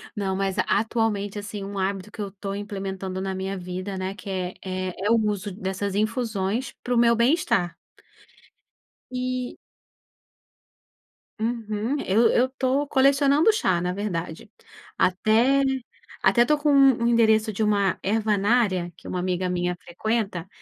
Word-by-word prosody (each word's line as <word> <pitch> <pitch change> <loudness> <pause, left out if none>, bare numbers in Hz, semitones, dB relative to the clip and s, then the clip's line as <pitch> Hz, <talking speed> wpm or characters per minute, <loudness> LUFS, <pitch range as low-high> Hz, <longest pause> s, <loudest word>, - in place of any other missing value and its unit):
Não 195 -3 -1
mas 195 -1 -1
atualmente 210 -2 0
assim 205 0 -6
um 200 0 -5
hábito 195 +1 -2
que 215 - -7
eu 200 - -2
estou 195 0 -6
implementando 195 -2 -5
na 190 0 -3
minha 190 +1 -3
vida, 185 +2 -5
né, 185 +1 -3
que 200 0 -10
é 185 -1 -3
é 185 -1 -3
é - - +2
o 230 - +5
uso 205 -1 -2
dessas 190 +1 -3
infusões 220 +1 -1
para 245 - -1
o - - +2
meu 235 0 +5
bem-estar. 235 - +2 1.4
E 255 0 -3 1.8
Uhum, 225 +2 -2
eu 220 +5 +4
eu 245 - +4
estou 265 +2 -1
colecionando 280 +6 +4
chá 185 - +1
na 180 0 -1
verdade. 180 -1 -4 0.5
Até 225 +9 +3 0.6
até 240 - +5
estou 300 +5 +2
com 295 0 0
um 270 -4 +5
endereço 220 -2 +3
de 215 +2 -2
uma 200 -2 +1
ervanária, 205 -3 +1
que - - -14
uma 180 - -3
amiga 180 0 -1
minha 180 0 -1
frequenta, 195 -1 -2
205 Hz, 145 wpm, -25 LUFS, 190-235 Hz, 1.8 s, o